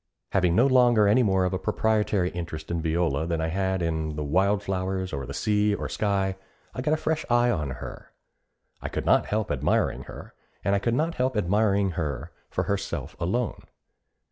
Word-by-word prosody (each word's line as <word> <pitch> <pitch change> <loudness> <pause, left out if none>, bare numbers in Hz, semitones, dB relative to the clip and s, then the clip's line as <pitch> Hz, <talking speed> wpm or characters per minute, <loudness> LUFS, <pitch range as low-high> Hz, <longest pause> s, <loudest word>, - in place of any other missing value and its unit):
Having 90 -3 +2
no 120 - +5
longer 120 -5 +5
any 105 +5 +5
more 95 -5 +2
of 90 - -1
a 95 - -1
proprietary 105 -4 +1
interest 85 -2 -6
in 85 -1 -1
Viola 80 -2 0
than 85 -1 -1
I 80 0 -1
had 95 +1 0
in 80 -2 -2
the 75 - -3
wild 95 +7 +2
flowers, 95 -1 -2
or 70 -2 -4
the 70 - -6
sea, 105 -1 +2
or - - -4
sky, 95 -2 0 0.4
I 125 - -4
got 150 +4 +2
a - - -3
fresh 155 0 -1
eye 120 0 +4
on 75 -9 -1
her. 65 -2 -8 0.7
I - - -4
could - - -4
not - - +4
help 110 0 -1
admiring 70 -3 0
her, - - -10 0.3
and 100 - +1
I 100 - +3
could 115 +3 0
not 160 +5 0
help 130 -4 0
admiring 100 0 +2
her 80 -2 -4 0.2
for - - -1
herself 95 -8 -3
alone. 110 +7 -1
95 Hz, 195 wpm, -26 LUFS, 85-110 Hz, 0.7 s, no